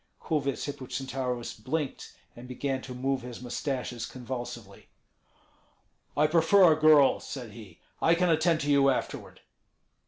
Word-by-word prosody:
Kulvyets 140 -4 -2
Hippocentaurus 130 -2 -4
blinked, 145 +1 -4 0.2
and 120 +1 -11
began 130 +1 -3
to 125 -1 -8
move 135 +1 -1
his 120 -1 -8
mustaches 125 -1 -4
convulsively. 120 -5 -8 1.3
"I 150 - +4
prefer 165 +3 +5
a - - 0
girl," 155 -3 +5
said 125 -5 -7
he; 105 -6 -13 0.2
"I 165 - +4
can 180 0 +2
attend 160 0 +2
to 145 0 0
you 140 -1 +5
afterward." 130 - -3
135 Hz, 130 wpm, -28 LUFS, 125-155 Hz, 1.3 s, prefer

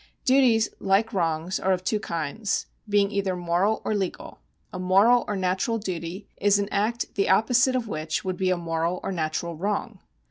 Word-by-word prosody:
Duties, 255 -5 +4
like 200 +4 +1
wrongs, 165 0 -1
are 190 - +2
of 185 0 -3
two 210 +3 0
kinds, 170 +3 -2 0.2
being 200 -1 +3
either 195 -2 -1
moral 180 +5 0
or - - 0
legal. 195 -3 -4 0.3
A 185 - -5
moral 200 +7 +4
or 205 - -2
natural 190 +5 0
duty 185 -1 -5
is 205 0 +3
an 200 0 -1
act 220 +4 -1
the 200 - 0
opposite 245 +6 +3
of 245 -3 -1
which 155 -3 -3
would 185 -1 -2
be 185 0 +1
a 185 - +2
moral 165 +1 -2
or - - -2
natural 165 0 -2
wrong. 200 +6 -3
195 Hz, 180 wpm, -25 LUFS, 175-215 Hz, 0.3 s, Duties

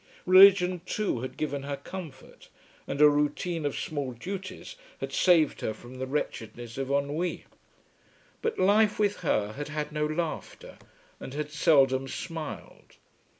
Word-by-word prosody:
Religion 185 -1 +7
too 210 - -1
had 130 +2 -6
given 145 -2 -2
her 140 0 -4
comfort, 165 -8 -10 0.4
and 140 - -4
a 150 - +9
routine 150 +2 0
of 145 - -4
small 140 -4 -3
duties 190 - -7 0.2
had - - -5
saved 165 -5 +3
her 110 - -2
from 125 +3 -12
the 130 - -3
wretchedness 120 -4 -4
of 135 -1 -3
ennui. 145 +5 -1 1.0
But 455 0 -1
life 210 +2 +4
with 205 -1 +1
her 105 - 0
had 145 +3 -5
had 150 0 -4
no 150 0 0
laughter, 170 - -5 0.4
and 135 - -8
had 150 0 -4
seldom 135 -3 +3
smiled. 155 - -7
150 Hz, 145 wpm, -28 LUFS, 135-180 Hz, 1.0 s, a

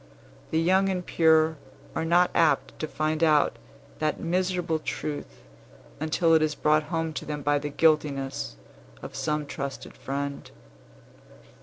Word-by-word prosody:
The 160 - +1
young 190 +4 +3
and 180 -2 -2
pure 160 -1 +3 0.4
are - - -1
not 175 +2 +4
apt 155 -4 +2
to 155 - -2
find 155 +1 -1
out 150 -2 +3 0.4
that 155 -1 0
miserable 180 -1 0
truth 150 -1 -5 0.6
until 165 +2 +2
it 160 - +5
is 155 -1 +1
brought 155 0 +2
home 165 -2 -1
to - - -5
them 150 -1 -5
by 145 0 +2
the 145 +1 -4
guiltiness 140 - +1 0.5
of - - -7
some 150 -1 -1
trusted 140 -1 -6
friend. 140 +1 -5
155 Hz, 140 wpm, -26 LUFS, 145-165 Hz, 0.6 s, it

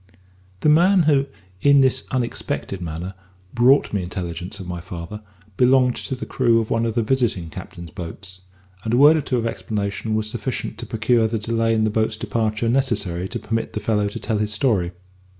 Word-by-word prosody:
The - - +4
man 175 +4 +5
who, 140 -3 +3 0.3
in 140 -1 +6
this 130 0 +2
unexpected 120 -6 -3
manner, 85 +3 -5 0.4
brought 125 +2 +4
me 100 - +1
intelligence 90 +1 -5
of 95 - -7
my 90 -1 -5
father, 90 +3 -7 0.4
belonged 125 0 +4
to 130 - -4
the 125 - -6
crew 120 -3 +2
of 110 - -3
one 115 0 +1
of 115 - -3
the 115 - +2
visiting 110 -9 0
captains' 85 -2 -9
boats, 90 +2 -9 0.4
and 115 +1 0
a - - +3
word 145 +4 +8
or - - 0
two 130 -2 -1
of 115 - -1
explanation 105 -1 -2
was 110 0 0
sufficient 120 +3 -4
to 120 - -6
procure 115 +1 +2
the 115 +1 -2
delay 115 +1 0
in 110 - +2
the 110 - +1
boat's 110 0 0
departure 110 0 -1
necessary 105 -8 0
to - - -4
permit 115 0 -3
the - - -2
fellow 105 -1 +1
to 100 - -5
tell 110 -1 -1
his 105 0 0
story. 105 -6 +1
110 Hz, 195 wpm, -22 LUFS, 95-125 Hz, 0.4 s, word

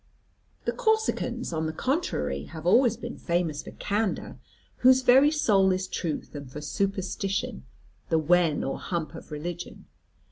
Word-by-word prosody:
The - - +1
Corsicans, 440 - 0
on 160 0 -1
the - - -2
contrary, 155 - -1
have 160 0 -9
always 235 +4 +4
been 240 0 -7
famous 170 -4 -1
for - - -10
candour, 210 0 -2 0.4
whose 260 +1 +5
very 265 +4 +7
soul 205 -11 +3
is 185 0 -1
truth, 160 -5 -4
and 140 -3 -8
for 150 - -6
superstition, 195 - -2 0.4
the 160 - +3
wen 160 0 +3
or 135 - -3
hump 170 -3 -3
of - - -10
religion. 170 +3 -6
180 Hz, 145 wpm, -27 LUFS, 155-235 Hz, 0.4 s, very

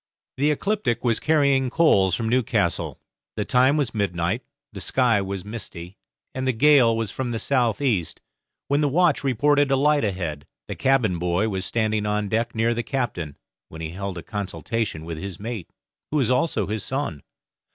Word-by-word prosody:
The 145 +3 +2
'Ecliptic' 150 - 0
was 115 -3 +2
carrying 140 -4 +2
coals 100 - +3
from 115 +3 -2
Newcastle. 125 0 0 0.4
The - - -2
time 130 +4 +3
was 145 -5 -1
midnight, 100 0 -1 0.3
the - - -7
sky 120 -5 +2
was 95 -1 -5
misty, 100 -5 -7 0.4
and 130 0 -3
the 130 - +2
gale 125 -3 +5
was 115 -4 -2
from 130 -2 -3
the 115 - -2
south 120 -3 +1
east, 100 - 0 0.5
when 140 +2 +2
the 145 - +2
watch 165 0 +2
reported 145 +2 +3
a 135 - +3
light 145 +2 +3
ahead. 85 -8 -3 0.2
The - - -4
cabin 125 -10 +2
boy 90 +5 +1
was 95 -2 -2
standing 110 -2 0
on 105 -1 -1
deck 115 +2 -1
near 115 +1 +2
the 120 - -1
captain, 120 - -3 0.3
when 80 - -9
he 80 0 -4
held 95 +1 -5
a 85 - -6
consultation 105 -3 -3
with 80 -1 -5
his 95 -1 -6
mate, 110 -4 -5 0.4
who 155 - 0
was 130 -4 +2
also 125 -5 +1
his 105 +1 -3
son. 130 - -3
115 Hz, 180 wpm, -24 LUFS, 95-135 Hz, 0.5 s, gale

